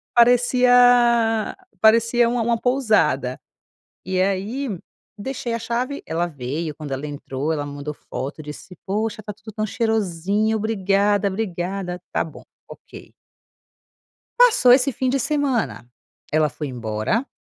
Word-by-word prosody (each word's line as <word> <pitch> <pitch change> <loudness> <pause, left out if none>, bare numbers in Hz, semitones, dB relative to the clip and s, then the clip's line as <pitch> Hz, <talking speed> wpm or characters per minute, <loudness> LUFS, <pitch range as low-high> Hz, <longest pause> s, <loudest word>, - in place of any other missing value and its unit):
Parecia 245 -2 +4 0.2
parecia 230 +2 +4
uma 240 0 0
uma 230 0 +1
pousada. 185 - +1 0.7
E 185 0 0
aí, 200 +8 -1 0.5
deixei 240 +1 -4
a 230 - -2
chave. 240 +5 -3
Ela 170 +2 -1
veio. 150 +1 -4
Quando 150 -2 -8
ela 135 +3 -3
entrou, 145 +1 -4
ela 145 -2 -2
me 145 - -7
mandou 145 +1 -5
foto 140 +1 -7
e - - -12
disse: 150 +5 -10
"Poxa, 215 +2 -2
está 210 0 -7
tudo 215 +2 -12
tão 215 0 -1
cheirosinho! 215 -1 0
Obrigada, 205 -1 +1
obrigada. 190 -2 -3
Está - - -1
bom. 160 - -11 0.3
Ok. - - -13 1.3
Passou 475 - +6
esse 260 +1 +4
fim 260 +3 -1
de 270 +2 +1
semana. 265 - -1 0.4
Ela 155 0 +2
foi 150 +3 -6
embora 120 - -2
210 Hz, 135 wpm, -22 LUFS, 160-240 Hz, 1.3 s, Passou